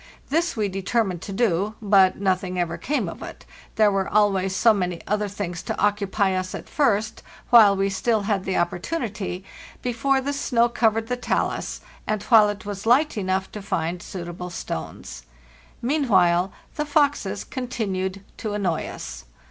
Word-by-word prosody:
This 330 -2 +1
we 210 -2 +1
determined 195 -1 -1
to 200 - -7
do, 205 -1 +1
but 195 -3 +4
nothing 185 -1 0
ever 170 -2 -1
came 295 +2 -1
of - - -7
it; - - -9 0.3
there 215 -1 +5
were 195 -1 0
always 195 -3 +2
so 225 +3 +5
many 180 -4 -2
other 210 0 0
things 185 -4 -5
to - - -4
occupy 205 -1 +1
us 185 0 -2
at - - -8
first, 220 -6 +1 0.3
while 215 -4 +8
we 195 0 +1
still 210 +3 +1
had 200 -2 0
the 190 - -1
opportunity, 195 - -2 0.4
before 250 +3 +1
the 280 +2 -2
snow 240 -4 +2
covered 225 -1 +1
the 250 - -1
talus, - - -2 0.3
and 215 -1 -1
while 220 -3 +6
it 205 0 -5
was 205 +1 -5
light 275 +6 +4
enough 190 -2 -1
to 210 - -7
find 175 -2 -2
suitable 175 0 -6
stones. 80 - -6 0.6
Meanwhile 190 - +3 0.3
the 300 - 0
foxes 285 -9 +1
continued 200 -7 -3
to 215 -3 -4
annoy 185 -6 -1
us. - - -8
200 Hz, 160 wpm, -24 LUFS, 185-230 Hz, 0.6 s, while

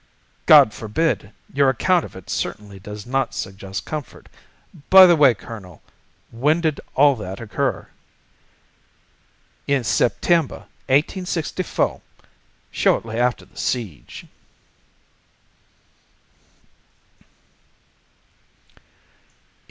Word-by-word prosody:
"God 110 - +7
forbid! 110 -1 -2 0.2
Your 140 0 +3
account 175 +7 +1
of - - -13
it 95 -2 -12
certainly 100 -2 -5
does 105 +2 -9
not 130 -1 -2
suggest 95 0 -6
comfort. 155 -3 -8 0.6
By 190 0 +10
the 175 -1 +5
way, 140 -6 +5
Colonel, 95 -9 -11 0.5
when 145 +8 +1
did 160 -3 -1
all 140 0 +5
that 95 -2 -7
occur?" 115 -3 -3 1.8
"In 140 -3 +1
September, 160 +7 0 0.2
1864—shortly 155 - -2
after 125 0 0
the - - -24
siege." 110 - -5
125 Hz, 80 wpm, -21 LUFS, 105-155 Hz, 1.8 s, By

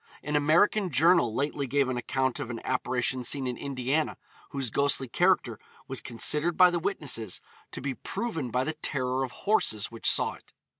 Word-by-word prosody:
An 150 +1 -3
American 170 +7 +3
journal 160 -3 +4
lately 140 +3 -2
gave 140 +1 +1
an 130 - -2
account 130 +2 -1
of 140 -4 -5
an 115 -2 -5
apparition 125 0 0
seen 135 +2 0
in 125 -1 -2
Indiana, 140 +3 -2 0.3
whose 135 -5 -4
ghostly 140 0 +2
character 115 - +1 0.3
was - - -3
considered 150 +8 +1
by 180 -1 +7
the 175 - -1
witnesses 145 - -2 0.3
to - - -7
be 135 0 -2
proven 160 - -4
by 125 +2 0
the 155 - -2
terror 130 -4 -2
of 130 - -3 0.2
horses 110 - +2
which 115 -1 0
saw - - +2
it. - - -19
135 Hz, 180 wpm, -28 LUFS, 125-155 Hz, 0.3 s, by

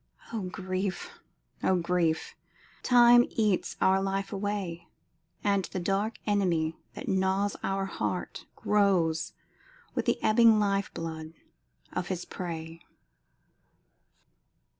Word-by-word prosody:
O 225 - -2
grief! 185 0 -4 0.4
O 190 - +3
grief! 170 -2 0 0.5
Time 240 -1 +7
eats 210 -4 0
our 190 +1 +4
life 195 +1 -2
away, 195 -4 -3 0.6
And 200 -2 +2
the 185 - -5
dark 195 +5 0
Enemy 175 -6 +1 0.2
that - - -7
gnaws 190 +1 +1
our 195 0 -1
heart 195 - -4
Grows 180 -6 +2 0.6
with - - -1
the - - +1
ebbing 225 0 +6
life 200 -1 +1
blood 160 -1 -6 0.6
of 175 - -2
his 180 -2 -3
prey! 165 -2 -6
190 Hz, 105 wpm, -29 LUFS, 170-205 Hz, 0.6 s, Time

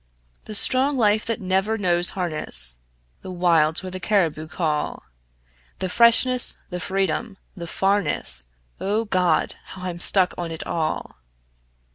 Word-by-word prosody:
The 215 - -5
strong 265 +6 +3
life 215 -2 +1
that 230 0 -2
never 190 +3 -1
knows 175 -3 +2
harness; 150 - +1 0.5
The - - -10
wilds 170 -2 +1
where 185 - -7
the 185 - -6
caribou 170 -7 -1
call; 155 -2 -3 0.7
The 185 - -4
freshness, 240 +4 +4
the 180 - -4
freedom, 195 +3 -3 0.2
the 170 -3 -8
farness 165 - +2 0.3
O 210 +3 -1
God! 180 -6 0
how 185 - -11
I'm 175 -2 -5
stuck 185 +1 +1
on 170 -1 -4
it 160 0 -7
all. 160 - -4
185 Hz, 135 wpm, -22 LUFS, 165-205 Hz, 0.7 s, freshness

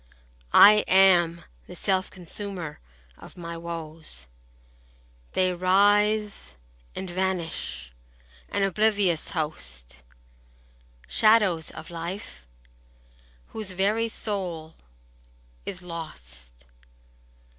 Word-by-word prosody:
I 210 - +8
am 175 -3 +5 0.2
the - - -10
self 190 -1 0
consumer 180 -2 -7 0.4
of - - -13
my 170 -1 -6
woes; 165 - -8 1.1
They 185 -1 +2
rise 205 - +2 0.4
and 190 - -5
vanish, 175 - -3 0.6
an 200 - 0
oblivious 195 -3 +1
host, 65 - -6 1.1
Shadows 205 -7 +3
of 160 - -10
life, 165 - -7 1.0
whose 210 -4 -6
very 210 +5 +1
soul 180 -8 -4 0.9
is 180 - -5
lost. 65 - -9
180 Hz, 80 wpm, -26 LUFS, 160-200 Hz, 1.1 s, I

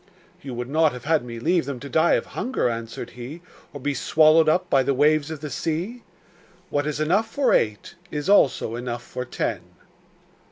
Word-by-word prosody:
'You 135 -3 -7
would 120 0 -4
not 155 +1 +2
have 125 -1 -8
had 155 -3 +2
me 120 -1 -7
leave 170 +4 +1
them 140 -2 -5
to 140 - -7
die 160 +5 +3
of - - +1
hunger,' 255 - -2
answered 115 +1 -6
he, 135 +8 -9 0.3
'or 145 - -8
be 145 +2 -1
swallowed 155 +3 +4
up 180 +3 +2
by 135 - +3
the 135 +1 0
waves 150 +2 +3
of 160 -2 -6
the 150 -2 -6
sea? 175 - -3 0.7
What 145 +1 0
is 150 -1 -2
enough 185 +9 +2
for 275 +2 +1
eight 105 -2 0 0.2
is 150 -1 -4
also 145 - +3
enough 120 0 -4
for 125 +1 -6
ten. - - -2
145 Hz, 195 wpm, -24 LUFS, 125-160 Hz, 0.7 s, swallowed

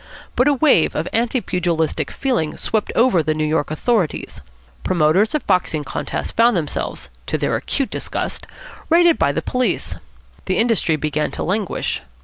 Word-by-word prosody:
But 250 - +3
a 290 - +5
wave 265 - +3
of 160 - -1
anti 240 +2 +1
pugilistic 165 -6 -1
feeling 240 - -1
swept 220 -2 -1
over 230 -8 +4
the 155 0 -1
New 155 0 0
York 155 -1 0
authorities. 180 +2 -1 0.4
Promoters 185 - +2
of 305 - -2
boxing 180 -5 +1
contests - - -4
found 230 -2 +3
themselves, 155 -4 -4 0.2
to - - 0
their - - 0
acute 275 -2 -2
disgust, - - -4 0.4
raided 340 0 +5
by 140 - +3
the 140 - -3
police. 250 0 -1 0.5
The 185 -1 0
industry 225 -8 +2
began 150 0 -1
to - - -3
languish. 195 +2 -2
185 Hz, 155 wpm, -20 LUFS, 155-240 Hz, 0.5 s, a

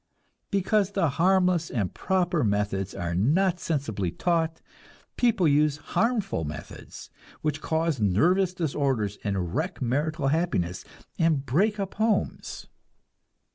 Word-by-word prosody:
Because 200 +1 +1
the 180 -6 +2
harmless 180 +2 +2
and 105 -7 -2
proper 180 -4 0
methods 100 -2 -1
are 85 -3 -3
not 165 - +2
sensibly 135 - -2
taught, 165 - 0 0.6
people 230 -8 +3
use 150 0 +3
harmful 215 - 0
methods, 75 0 -8 0.3
which 155 0 -1
cause 160 -5 0
nervous 175 - +3
disorders, 135 - -1
and 95 -4 -2
wreck 170 - -2
marital 145 +3 0
happiness, 135 - -1 0.4
and 160 -4 +2
break 205 - +1
up 195 -1 -3
homes. 215 -1 -1
155 Hz, 115 wpm, -26 LUFS, 115-185 Hz, 0.6 s, people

